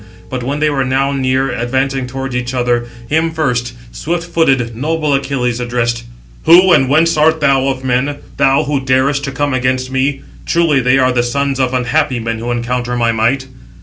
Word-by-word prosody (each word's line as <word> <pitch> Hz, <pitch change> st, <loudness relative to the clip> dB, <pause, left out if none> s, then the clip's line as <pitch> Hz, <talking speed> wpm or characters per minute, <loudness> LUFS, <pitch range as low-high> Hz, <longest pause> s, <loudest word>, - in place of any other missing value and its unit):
But 130 Hz, -1 st, -3 dB
when 140 Hz, +4 st, -3 dB
they 155 Hz, 0 st, +2 dB
were 135 Hz, -2 st, 0 dB
now 135 Hz, +1 st, 0 dB
near, 135 Hz, 0 st, 0 dB
advancing 130 Hz, +2 st, -1 dB
towards 135 Hz, 0 st, -5 dB
each 125 Hz, +1 st, -3 dB
other, 120 Hz, -1 st, 0 dB, 0.2 s
him 160 Hz, +4 st, +1 dB
first 125 Hz, -7 st, -1 dB, 0.2 s
swift 170 Hz, +2 st, -3 dB
footed, 135 Hz, -9 st, +1 dB
noble 155 Hz, +3 st, -1 dB
Achilles 135 Hz, -3 st, -1 dB
addressed: 120 Hz, -1 st, -2 dB, 0.4 s
"Who, 180 Hz, +3 st, +7 dB
and 135 Hz, -5 st, +3 dB
whence 160 Hz, +3 st, +3 dB
art 160 Hz, +1 st, +3 dB
thou 135 Hz, -2 st, +2 dB
of 130 Hz, -1 st, -2 dB
men, 130 Hz, +3 st, 0 dB, 0.2 s
thou 135 Hz, +2 st, +3 dB
who 145 Hz, -1 st, -1 dB
darest 135 Hz, +2 st, +1 dB
to 140 Hz, -, -4 dB
come 145 Hz, 0 st, -1 dB
against 130 Hz, 0 st, -1 dB
me? 135 Hz, +1 st, 0 dB, 0.3 s
Truly 165 Hz, -5 st, +2 dB
they 130 Hz, +1 st, +3 dB
are 130 Hz, -1 st, +3 dB
the 125 Hz, -1 st, +1 dB
sons 135 Hz, +2 st, -1 dB
of 130 Hz, -1 st, 0 dB
unhappy 130 Hz, +1 st, 0 dB
men 115 Hz, 0 st, -3 dB
who 120 Hz, +2 st, -4 dB
encounter 120 Hz, +1 st, -2 dB
my 120 Hz, -1 st, +1 dB
might." 115 Hz, +4 st, 0 dB
130 Hz, 185 wpm, -15 LUFS, 125-140 Hz, 0.4 s, Who